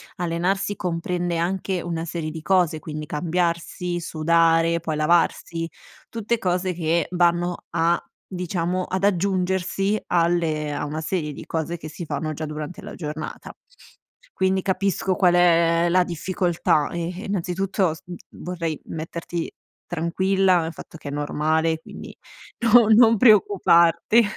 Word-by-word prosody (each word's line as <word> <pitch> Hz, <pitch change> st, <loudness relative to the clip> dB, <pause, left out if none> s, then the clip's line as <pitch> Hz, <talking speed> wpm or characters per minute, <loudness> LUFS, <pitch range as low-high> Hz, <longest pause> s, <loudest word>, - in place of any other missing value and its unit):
allenarsi 180 Hz, +4 st, -1 dB
comprende 175 Hz, 0 st, -2 dB
anche 185 Hz, +1 st, -1 dB
una 165 Hz, -1 st, -3 dB
serie 160 Hz, -2 st, -4 dB
di 160 Hz, 0 st, -7 dB
cose, 175 Hz, -3 st, +2 dB
quindi 155 Hz, 0 st, -6 dB
cambiarsi, 175 Hz, +2 st, -2 dB
sudare, 165 Hz, +1 st, +2 dB
poi 160 Hz, -2 st, -3 dB
lavarsi, 165 Hz, +1 st, +1 dB, 0.4 s
tutte 230 Hz, 0 st, -2 dB
cose 180 Hz, -1 st, 0 dB
che 170 Hz, 0 st, 0 dB
vanno 175 Hz, 0 st, +2 dB
a 170 Hz, +1 st, +1 dB, 0.2 s
diciamo, 180 Hz, 0 st, -2 dB
ad 190 Hz, +1 st, -3 dB
aggiungersi 190 Hz, +1 st, 0 dB
alle 165 Hz, -3 st, +1 dB
a 145 Hz, -, -3 dB
una 155 Hz, +2 st, -4 dB
serie 155 Hz, -3 st, -2 dB
di -, -, -9 dB
cose 165 Hz, +1 st, -3 dB
che 155 Hz, -, -9 dB
si 160 Hz, +3 st, -8 dB
fanno 155 Hz, 0 st, -3 dB
già 155 Hz, +1 st, -5 dB
durante 150 Hz, +2 st, -6 dB
la -, -, -9 dB
giornata. 155 Hz, -1 st, -6 dB, 0.8 s
Quindi 190 Hz, 0 st, +1 dB
capisco 190 Hz, -1 st, 0 dB
qual 175 Hz, -1 st, +4 dB
è 170 Hz, -1 st, +4 dB
la 180 Hz, +1 st, +4 dB
difficoltà 175 Hz, -3 st, 0 dB
e 170 Hz, 0 st, -3 dB
e, -, -, -7 dB
innanzitutto, 190 Hz, -1 st, -1 dB
s 160 Hz, -, -11 dB, 0.3 s
vorrei 170 Hz, -4 st, -5 dB
metterti 165 Hz, +1 st, -5 dB, 0.3 s
tranquilla 185 Hz, +2 st, +1 dB
nel 160 Hz, +1 st, -4 dB
fatto 165 Hz, -, -11 dB
che 145 Hz, -, -8 dB
è -, -, -5 dB
normale, 155 Hz, +2 st, 0 dB
quindi -, -, -11 dB, 0.4 s
no 230 Hz, -1 st, +6 dB
non 225 Hz, 0 st, +6 dB
preoccuparti. 200 Hz, -1 st, +5 dB
170 Hz, 135 wpm, -23 LUFS, 165-185 Hz, 0.8 s, no